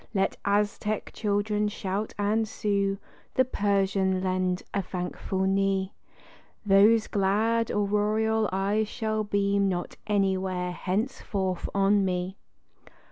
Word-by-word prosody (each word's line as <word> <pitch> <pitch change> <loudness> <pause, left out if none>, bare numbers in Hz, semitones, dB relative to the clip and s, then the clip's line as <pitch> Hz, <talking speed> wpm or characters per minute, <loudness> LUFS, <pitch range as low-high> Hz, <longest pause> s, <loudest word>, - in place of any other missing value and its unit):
Let 195 0 +1
Aztec 210 +1 0
children 210 0 0
shout 200 +1 -3
and 215 +2 +1
sue, 200 -2 0 0.4
the 260 - +4
Persian 195 -4 +1
lend 185 -1 0
a 200 - +1
thankful 185 +1 -4
knee: 195 0 +1 0.7
Those 210 +3 +5
glad 215 +4 +1
auroral 210 +1 +1
eyes 200 +3 0
shall 215 -1 -2
beam 200 -1 +1
not 175 -2 -3
anywhere 190 -3 0
henceforth 190 -1 -2
on 200 +1 +4
me. 185 +1 -2
200 Hz, 105 wpm, -27 LUFS, 190-210 Hz, 0.7 s, Those